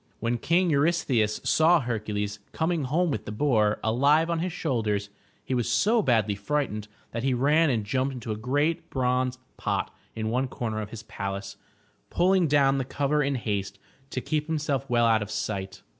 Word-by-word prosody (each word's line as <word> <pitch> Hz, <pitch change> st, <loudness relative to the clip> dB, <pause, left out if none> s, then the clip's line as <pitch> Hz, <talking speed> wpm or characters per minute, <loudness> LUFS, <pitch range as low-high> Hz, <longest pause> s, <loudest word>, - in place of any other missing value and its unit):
When 115 Hz, +1 st, -1 dB
King 175 Hz, +4 st, +2 dB
Eurystheus 140 Hz, -8 st, +2 dB
saw 165 Hz, +2 st, +4 dB
Hercules 105 Hz, -4 st, -3 dB
coming 160 Hz, -2 st, 0 dB
home 165 Hz, +5 st, +1 dB
with 110 Hz, -, -3 dB
the -, -, -5 dB
boar 110 Hz, -3 st, +2 dB
alive 145 Hz, +9 st, +3 dB
on 165 Hz, -, 0 dB
his 180 Hz, +2 st, -2 dB
shoulders, 110 Hz, -, -1 dB, 0.3 s
he -, -, -2 dB
was 120 Hz, -2 st, 0 dB
so 220 Hz, -, +3 dB
badly 110 Hz, -, +2 dB
frightened 105 Hz, 0 st, -2 dB, 0.2 s
that 115 Hz, -, -3 dB
he 130 Hz, 0 st, +1 dB
ran 150 Hz, +5 st, +3 dB
and 115 Hz, -5 st, 0 dB
jumped 130 Hz, +5 st, 0 dB
into 120 Hz, -4 st, -6 dB
a -, -, -1 dB
great 145 Hz, +9 st, -1 dB
bronze 130 Hz, -1 st, 0 dB, 0.2 s
pot -, -, -2 dB, 0.2 s
in 110 Hz, 0 st, -2 dB
one 130 Hz, +3 st, +1 dB
comer 110 Hz, -3 st, -3 dB
of 105 Hz, -, -6 dB
his 110 Hz, -2 st, -8 dB
palace, 100 Hz, -2 st, -5 dB, 0.5 s
pulling 185 Hz, -1 st, +3 dB
down 140 Hz, -2 st, +3 dB
the -, -, 0 dB
cover 145 Hz, +3 st, 0 dB
in 140 Hz, -1 st, 0 dB
haste 100 Hz, -4 st, -3 dB, 0.3 s
to 130 Hz, -, -3 dB
keep 150 Hz, +3 st, -1 dB
himself 145 Hz, -4 st, -1 dB
well 120 Hz, -1 st, +3 dB
out 110 Hz, -1 st, +4 dB
of 105 Hz, -, -4 dB
sight. 95 Hz, -3 st, -4 dB
130 Hz, 180 wpm, -27 LUFS, 110-150 Hz, 0.5 s, saw